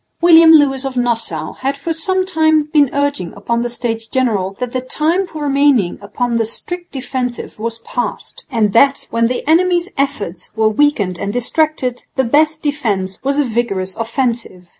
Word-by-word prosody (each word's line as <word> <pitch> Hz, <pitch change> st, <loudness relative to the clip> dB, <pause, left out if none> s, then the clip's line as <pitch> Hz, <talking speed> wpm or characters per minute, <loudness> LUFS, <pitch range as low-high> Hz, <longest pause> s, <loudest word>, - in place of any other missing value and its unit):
William 330 Hz, -1 st, +7 dB
Lewis 285 Hz, -4 st, +4 dB
of 265 Hz, -1 st, -4 dB
Nassau 240 Hz, -2 st, -1 dB
had 275 Hz, +2 st, -3 dB
for 325 Hz, +4 st, -3 dB
sometime 320 Hz, -3 st, +2 dB
been 290 Hz, -3 st, +4 dB
urging 285 Hz, -10 st, -1 dB
upon 235 Hz, +4 st, -2 dB
the 240 Hz, -, -2 dB
States 230 Hz, -2 st, -4 dB
General 210 Hz, -7 st, -1 dB
that 250 Hz, -1 st, -3 dB
the 255 Hz, -, -2 dB
time 325 Hz, +8 st, 0 dB
for 310 Hz, -3 st, -7 dB
remaining 280 Hz, -9 st, +2 dB
upon 235 Hz, +4 st, -2 dB
the 225 Hz, -, +1 dB
strict 350 Hz, +10 st, -5 dB
defensive 255 Hz, -4 st, -4 dB
was 230 Hz, +1 st, -2 dB
past, 240 Hz, +1 st, -5 dB
and 220 Hz, -6 st, +1 dB
that, 275 Hz, +4 st, +3 dB
when 230 Hz, 0 st, +2 dB
the 250 Hz, +3 st, -3 dB
enemy's 350 Hz, +2 st, +2 dB
efforts 215 Hz, -11 st, -3 dB
were 220 Hz, -1 st, +3 dB
weakened 215 Hz, -7 st, +1 dB
and 200 Hz, -, -2 dB
distracted, 250 Hz, +1 st, -1 dB
the 265 Hz, -, +2 dB
best 305 Hz, +5 st, +2 dB
defence 210 Hz, -11 st, -2 dB
was 275 Hz, +1 st, 0 dB
a 295 Hz, -, +3 dB
vigorous 220 Hz, -6 st, -2 dB
offensive. 230 Hz, -6 st, -3 dB
255 Hz, 165 wpm, -16 LUFS, 230-295 Hz, -, William